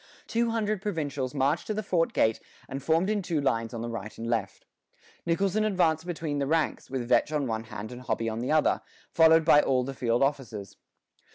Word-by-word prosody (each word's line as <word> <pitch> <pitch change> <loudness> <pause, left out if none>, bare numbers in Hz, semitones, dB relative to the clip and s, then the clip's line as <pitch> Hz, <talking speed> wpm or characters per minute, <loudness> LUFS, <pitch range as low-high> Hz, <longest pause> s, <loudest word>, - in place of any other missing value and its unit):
Two 235 0 0
hundred 215 -3 -1
provincials 145 -9 -3
marched 140 +4 +1
to 215 - -2
the 215 - -2
fort 170 -4 +1
gate 110 0 +2 0.3
and 135 +1 -5
formed 160 +6 +2
in 210 -1 0
two 170 -4 -1
lines 115 -5 0
on 115 -2 -5
the - - -3
right 110 -2 -6
and 115 - -5
left. 110 -5 -2 0.6
Nicholson 195 +5 +1
advanced 175 -6 +1
between 155 -4 -3
the 140 - -1
ranks, 160 +1 0
with 130 -3 -3
Vetch 150 - +3
on 150 -2 0
one 110 -2 -3
hand 110 0 -7
and 125 0 -8
Hobby 115 -2 -2
on 110 0 -2
the 125 +5 -2
other, 155 -1 +3 0.3
followed 160 0 +5
by 150 -2 +7
all 130 -1 +1
the 135 +2 -5
field 120 -1 +1
officers. 125 -8 -3
145 Hz, 205 wpm, -28 LUFS, 120-165 Hz, 0.6 s, by